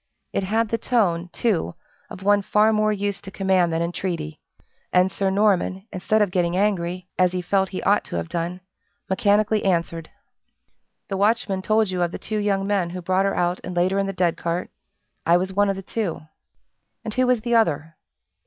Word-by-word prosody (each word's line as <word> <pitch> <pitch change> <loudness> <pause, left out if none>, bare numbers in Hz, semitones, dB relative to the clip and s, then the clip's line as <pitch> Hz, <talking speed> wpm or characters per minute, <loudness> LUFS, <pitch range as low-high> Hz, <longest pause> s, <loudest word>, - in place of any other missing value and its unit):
It - - 0
had 220 +3 0
the 230 - -1
tone, 180 -8 +1
too, 180 - 0 0.3
of 190 - -9
one 205 +1 +4
far 215 +2 +3
more 215 0 +2
used 200 -2 -2
to - - -6
command 190 -3 +1
than 165 +1 0
entreaty; 170 -3 -4 0.5
and 185 +1 +3
Sir 195 0 0
Norman, 190 -1 +1
instead 210 +4 +2
of 200 - -2
getting 175 -1 +1
angry, 185 -3 0
as 180 -1 +3
he 180 - -1
felt 190 +1 +1
he 185 - -5
ought 205 +1 +3
to - - -5
have - - -2
done, 170 +2 -3 0.5
mechanically 210 +2 +2
answered: 170 -3 -1 1.0
"The 195 - -2
watchman 200 -2 +1
told 215 0 +2
you 180 -1 -2
of 175 -1 +1
the - - -5
two 215 0 -3
young 200 -2 0
men 195 -4 0
who 180 +1 -6
brought 185 +2 +2
her 195 - 0
out 175 +1 0
and 180 - -6
laid 175 +2 +2
her 195 - +1
in 195 - 0
the - - -1
dead 180 -3 0
cart 170 +1 -3 0.5
I 170 +1 +4
was 190 +1 -2
one 205 +1 +3
of 195 - 0
the 195 - -7
two." 200 -3 -3 0.8
"And 220 - -4
who 255 +1 +2
was 250 -3 +2
the 240 +1 -2
other?" 165 -8 +1
190 Hz, 200 wpm, -23 LUFS, 175-205 Hz, 1.0 s, one